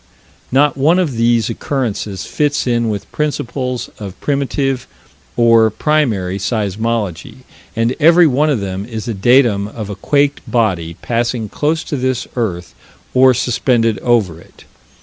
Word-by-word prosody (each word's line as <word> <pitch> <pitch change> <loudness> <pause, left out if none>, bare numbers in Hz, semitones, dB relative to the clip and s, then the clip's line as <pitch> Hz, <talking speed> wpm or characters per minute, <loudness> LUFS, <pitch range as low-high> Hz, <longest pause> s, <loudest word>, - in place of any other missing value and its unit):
Not 140 +2 +3
one 155 +6 +3
of 165 -9 0
these 115 -1 +2
occurrences 110 -8 -3
fits 145 -1 0
in 120 -2 +1
with 105 -2 -5
principles 130 -4 -3
of 100 -3 -8
primitive, 135 -2 -1 0.5
or 115 -2 +5
primary, 110 -9 0
seismology, 105 0 -3 0.3
and 115 +2 0
every 165 +3 +6
one 150 +1 +2
of 130 -8 0
them 95 0 -4
is 110 0 -6
a 115 - -1
datum 110 -1 +3
of 105 -1 -7
a - - -5
quaked 140 +7 +1
body 90 -9 0
passing 120 -2 -1
close 155 +7 -1
to 145 - -4
this 130 -1 -1
earth 90 -8 -3 0.4
or 130 0 +5
suspended 115 -2 +1
over 105 -9 +1
it. - - -19
120 Hz, 140 wpm, -16 LUFS, 105-135 Hz, 0.5 s, every